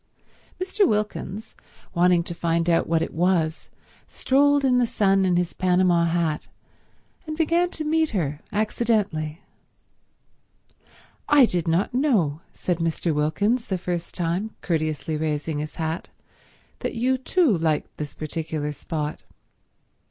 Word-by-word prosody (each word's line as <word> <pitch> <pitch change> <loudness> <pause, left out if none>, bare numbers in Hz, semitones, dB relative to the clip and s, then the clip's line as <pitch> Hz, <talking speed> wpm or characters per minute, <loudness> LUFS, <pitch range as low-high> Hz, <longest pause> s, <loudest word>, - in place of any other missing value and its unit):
Mr. 380 +2 +2
Wilkins, 210 - -2 0.4
wanting 175 -1 +4
to 170 - -6
find 170 0 0
out 170 -1 +3
what 165 0 +2
it - - -5
was, 165 -2 0 0.4
strolled 285 +1 +3
in 250 -1 +4
the 245 - +2
sun 195 -3 +2
in 180 -1 +2
his 175 0 0
Panama 180 -2 +3
hat, 165 -2 0 0.8
and 310 0 -4
began 340 +2 +2
to 315 - -5
meet 315 0 +2
her 150 -8 -2
accidentally. 205 -7 0 1.9
"I 290 -3 +7
did 175 -6 -2
not 170 +7 +1
know," 210 - +1
said 180 -2 -2
Mr. 165 0 0
Wilkins 200 +11 +1
the 190 - -1
first 175 -1 -4
time, 180 +5 -2
courteously 155 -2 -1
raising 150 0 -2
his 150 0 -5
hat, 160 +1 -3 0.7
"that - - -3
you 250 +3 +2
too 300 - +2
liked 160 -2 -1
this 150 -1 -6
particular 155 -1 -3
spot." 150 0 -4
175 Hz, 130 wpm, -24 LUFS, 160-225 Hz, 1.9 s, I